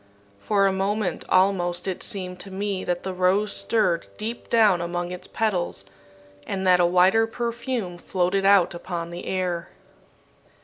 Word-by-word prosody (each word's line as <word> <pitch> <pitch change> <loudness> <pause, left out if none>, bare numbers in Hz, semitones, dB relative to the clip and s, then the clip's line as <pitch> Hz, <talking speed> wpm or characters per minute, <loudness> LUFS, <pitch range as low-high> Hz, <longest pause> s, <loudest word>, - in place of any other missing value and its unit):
For 200 - +2
a 195 - +2
moment 195 -1 -1
almost 185 -1 +2
it 185 - -3
seemed 180 -2 -3
to 180 - -8
me 195 0 -3
that 175 0 -2
the 190 - -3
rose 190 +3 +1
stirred 200 -4 0
deep 225 +3 -6
down 210 -6 +4
among 175 +1 -3
its 180 - -8
petals, 180 - -1 0.6
and 190 -1 -3
that 180 -1 +5
a 175 - +5
wider 185 +6 +4
perfume 235 -5 -3
floated 185 +2 0
out 195 -3 +5
upon 170 -1 -5
the 175 +1 -7
air. 180 -2 -2
185 Hz, 150 wpm, -24 LUFS, 175-205 Hz, 0.6 s, that